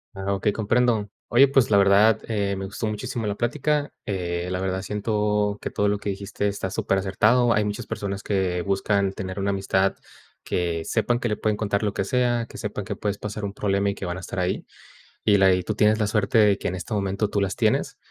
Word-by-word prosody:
Ah, 95 +1 -2
okey, 100 +2 +1
comprendo. 115 0 +1 0.2
Oye, 130 +4 +6
pues, 135 -2 +3
la 105 - +5
verdad, 100 +2 +5
eh, 100 -3 -1
me 95 - -4
gustó 100 +3 -4
muchísimo 115 +1 -3
la 100 - -1
plática, 145 +5 -1
eh, 90 -3 -2
la 90 0 -2
verdad, 95 0 -2
siento 105 0 0
que - - -3
todo 105 - 0
lo 100 0 0
que 100 - -4
dijiste 100 +1 -3
está 100 -2 -3
súper 95 - 0
acertado. 110 +6 +3
Hay 105 0 +2
muchas 105 0 -3
personas 100 -1 -4
que 95 -3 0
buscan 100 0 +1
tener 95 0 -6
una 100 0 0
amistad, 95 0 +1 0.5
que 85 -2 -1
sepan 120 +6 0
que 120 - -1
le 105 - -1
pueden 105 -1 0
contar 100 -1 -1
lo 105 -2 0
que 95 - -1
sea, 120 0 +1
que - - -10
sepan 105 -2 -4
que - - -4
puedes 100 -1 -3
pasar 105 0 -5
un 100 - -4
problema 100 -1 0
y - - -4
que - - -6
van 90 +1 -3
a - - -5
estar 95 - -5
ahí. 90 0 -1 0.6
Y 100 - +5
la 95 -1 +5
y 90 - -1
tú - - -3
tienes 110 +1 +3
la 105 - +1
suerte 105 +1 +1
de 105 -2 +5
que - - -5
en 95 - -1
este 95 +5 -6
momento 100 0 -1
tú 100 - 0
las 95 -2 0
tienes, - - 0
100 Hz, 230 wpm, -24 LUFS, 95-110 Hz, 0.6 s, Oye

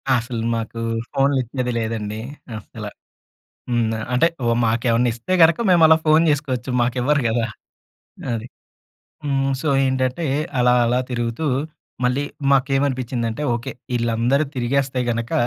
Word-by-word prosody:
అసలు 120 -1 -2
మాకు 115 0 -4 0.3
ఫోనులు 135 0 +2
ఇచ్చేది 125 +1 -3
లేదండి 110 -1 -3 0.4
అసల. 105 - -9 0.9
హ్మ్. 120 -2 +1 0.2
అంటే 125 +6 +4 0.2
ఓ - - +2 0.2
మాకేమన్నా 115 +1 +2
ఇస్తే 120 +11 -2
గనక 165 0 +6
మేము 175 -2 +5
అలా 160 0 +7
ఫోను 155 +2 +5
చేసుకోవచ్చు. 135 -4 -1
మాకివ్వరు 125 +4 +1
కదా! 115 0 0 0.9
అది. 115 +1 -4 0.8
హ్మ్. 135 -1 0
సో, 155 - -2 0.2
ఏంటంటే 130 +4 0 0.3
అలా 125 0 +4
అలా 125 +2 +2
తిరుగుతూ 120 +4 -2 0.6
మళ్ళీ 125 +3 +1 0.3
మాకేమనిపించిందంటే 130 -3 0
ఓకే. 120 0 -4 0.2
వీళ్ళందరూ 120 +4 +1
తిరిగేస్తే 130 +1 0
గనుక 115 0 -3
125 Hz, 120 wpm, -21 LUFS, 115-140 Hz, 0.9 s, అలా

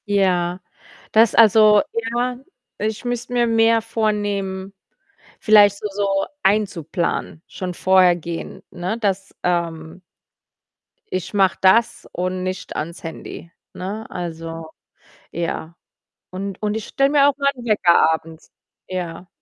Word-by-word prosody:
Ja. 180 -3 +1 0.5
Das 225 0 +4
also, 215 -1 +6
ja, 240 +2 -2 0.4
ich 215 +2 -3
müsste 245 0 -3
mir 240 -1 +2
mehr 225 0 +3
vornehmen. 205 -3 -2 0.7
Vielleicht 205 -2 +6
so 210 - -4
so 195 -1 0 0.2
einzuplanen. 180 -5 -1
Schon 180 -1 -5
vorher 185 0 +4
gehen, 170 0 -7
ne, 185 +6 -3
dass, 195 -2 -2
ähm 170 -1 -2 1.1
ich 185 +1 -3
mache 195 -2 +3
das 230 +5 +3
und 185 +1 -2
nicht 185 0 -5
ans 170 +3 -5
Handy, 165 +1 -8 0.2
ne? 205 +4 -6
Also, 165 -2 -6 0.6
ja. 170 -1 -4 0.6
Und 195 +1 -6
und 210 -1 -1
ich 220 - -6
stelle 275 0 +2
mir 285 -1 +5
auch 285 - +1
meinen 280 -3 -1
Wecker 185 -7 +4
abends. 160 0 -7 0.4
Ja. 180 -1 -5
195 Hz, 120 wpm, -21 LUFS, 175-220 Hz, 1.1 s, also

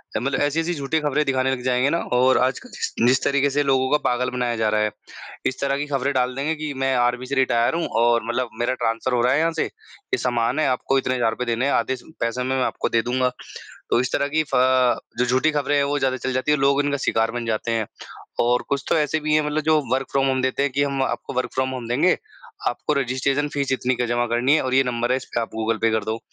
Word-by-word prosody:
अ, - - +1
मतलब 135 +3 -1
ऐसी 145 +2 +1
ऐसी 170 +2 -1
झूठी 150 +1 -1
खबरें 150 0 +1
दिखाने 130 -1 +1
लग 130 -1 -2
जाएँगे 130 +2 +2
ना 165 - +1 0.2
और 130 +1 +4
आजकल 195 - -6
जिस 455 - -4 0.3
जिस - - -9
तरीके 140 0 +2
से 145 +1 +1
लोगों 130 -1 +2
का 150 - +5
पागल 125 +1 0
बनाया 125 -1 -1
जा 110 -1 +1
रहा 105 0 +1
है। 105 - +1 0.5
इस 130 - -1
तरह 140 0 0
की 145 - -2
खबरें 140 0 -1
डाल 125 -1 +1
देंगे 145 +4 -1
कि 155 -2 -4
मैं 135 0 +2
आर्मी 120 +1 +1
से 140 +2 -3
रिटायर 125 -1 +2
हूँ। 170 - -1 0.2
और 120 -1 +3
मतलब 120 +1 -1
मेरा 120 +2 +1
ट्रांसफर 115 +1 -1
हो 120 - +2
रहा 125 +2 +3
है 140 - +2
यहाँ 165 +1 +2
से, 160 - 0
ये 435 -2 -7
सामान 120 +3 0
है, 155 - +2
आपको 130 +1 +1
इतने 130 -1 0
हज़ार 120 -2 +2
रुपए 125 - -4
देने 120 +2 0
है, 140 - +1
आधे 130 - +1
स 125 - -14 0.2
पैसे 115 +2 -1
में 130 +1 -1
मैं 130 - +1
आपको - - -2
दे 115 - +2
दूँगा। 125 +1 0 0.6
तो - - +3
इस 125 - -3
तरह 140 - +1
की 155 +2 +1
फ - - +4 0.6
जो 125 - +3
झूठी 130 +5 +2
खबरें 145 -1 0
है। 145 - +3
वो 145 +1 0
ज़्यादा 130 -1 0
चल 130 0 -3
जाती 130 +3 0
है, 150 - +3
लोग 140 +1 +3
इनका 145 0 0
शिकार 115 0 +1
बन 120 0 -4
जाते 115 +1 -1
हैं। 115 -1 0 0.5
और 120 +1 +3
कुछ 140 -1 -1
तो - - +3
ऐसे 155 +1 +1
भी 155 0 -1
है। 155 -1 +2
मतलब 150 +1 0
जो 155 0 +4
वर्क 135 0 -1
फ्रॉम 135 0 +2
होम 130 -1 +1
देते 130 +1 0
हैं 140 - 0
कि 140 +2 +1
हम 140 -1 -1
आपको - - -3
वर्क 130 0 -2
फ्रॉम 130 0 +1
होम 125 -3 -5
देंगे, 150 +10 +3 0.5
आपको 150 - -2
रजिस्ट्रेशन 135 +2 0
फ़ीस 140 -2 -1
इतनी 130 -1 0
का 125 - -1
जमा 120 +1 0
करनी 120 +5 +2
है - - +2
और 130 0 -2
ये 135 - +5
नंबर 120 -1 -1
है 130 - +3
इस 130 - -8
पे - - +2
आप 115 - -4
गूगल 110 0 0
पे 115 - +3
कर 110 -1 0
दो। 110 +1 -2
130 Hz, 275 wpm, -22 LUFS, 120-140 Hz, 0.6 s, का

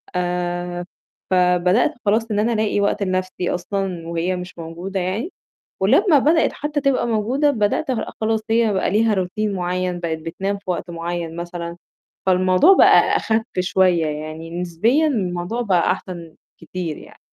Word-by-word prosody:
آآ، 175 0 -2 0.5
فبدأت 180 - +3
خلاص 220 +2 +1
إن 205 - +1
أنا 230 +2 +1
ألاقي 215 -2 0
وقت 200 0 0
لنَفْسي 185 -1 -2
أصلًا، 180 -2 -3
وهي 170 +2 -1
مش 180 0 -8
موجودة 170 +4 -5
يعني 195 - -2 0.5
ولمّا 290 - +4
بدأِت 315 +4 +3
حتى 295 0 -3
تبقى 270 -3 +1
موجودة، 235 +7 +1
بدأت 220 +1 0
أبقى 245 - -2
خ - - -33
خلاص 220 0 +1
هي 225 -1 +3
بقى 190 -1 0
ليها 215 +2 +3
روتين 200 +3 -1
معيّن 180 -1 -2
بقِت 160 -2 -2
بتنام 195 +5 -3
في 195 -2 -7
وقت 175 0 -3
معيّن 170 -1 -4
مثلًا، 170 0 -6 0.5
فالموضوع 185 - +5
بقى - - +6
أخَفّ 220 0 +1 0.2
شوية 180 -2 +2
يعني، 155 +3 -5
نسبيًا 225 - +2
الموضوع 190 -3 -2
بقى 185 -6 +2
أحسن 170 -3 -8 0.3
كتير 165 -1 -5
يعني. - - -15
185 Hz, 150 wpm, -21 LUFS, 175-220 Hz, 0.5 s, بقى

